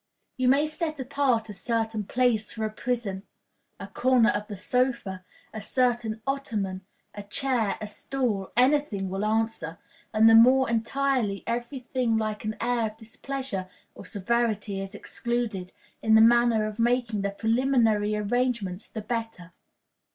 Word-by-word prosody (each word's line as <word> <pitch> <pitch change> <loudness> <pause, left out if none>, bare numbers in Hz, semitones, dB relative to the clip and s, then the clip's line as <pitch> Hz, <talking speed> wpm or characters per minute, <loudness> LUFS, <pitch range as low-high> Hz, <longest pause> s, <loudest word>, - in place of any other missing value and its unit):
You 255 -1 0
may 280 +4 +4
set 310 -1 -4
apart 260 -4 0
a 210 - -7
certain 225 0 -2
place 235 -2 +1
for 220 -1 -3
a 215 - -3
prison 220 -4 -3 0.6
a - - -6
corner 250 -2 +3
of 210 0 -1
the 205 - -7
sofa, 235 -5 -1 0.3
a 220 - -5
certain 235 -2 0
ottoman, 215 -9 -2 0.3
a 205 - -7
chair, 225 +1 -1
a 215 - -5
stool, 210 -2 -3
any 265 +4 +5
thing 200 -9 -5
will 195 +2 -2
answer; 220 -6 -1 0.3
and 220 0 +5
the 225 - +7
more 255 +4 +7
entirely 235 -2 0
every 240 +4 -3
thing 250 -2 0
like 215 -1 -2
an 215 0 -3
air 235 -1 +1
of 215 0 -10
displeasure 225 -3 -5 0.2
or - - -11
severity 215 -1 -1
is 195 0 -7
excluded, 235 -7 -3 0.3
in 220 0 +4
the - - +8
manner 235 -1 +5
of 215 +1 -6
making 235 -2 +1
the 200 - 0
preliminary 225 -1 +2
arrangements, 210 -3 -1
the 220 - -6
better. 225 -6 -5
225 Hz, 150 wpm, -27 LUFS, 210-250 Hz, 0.6 s, the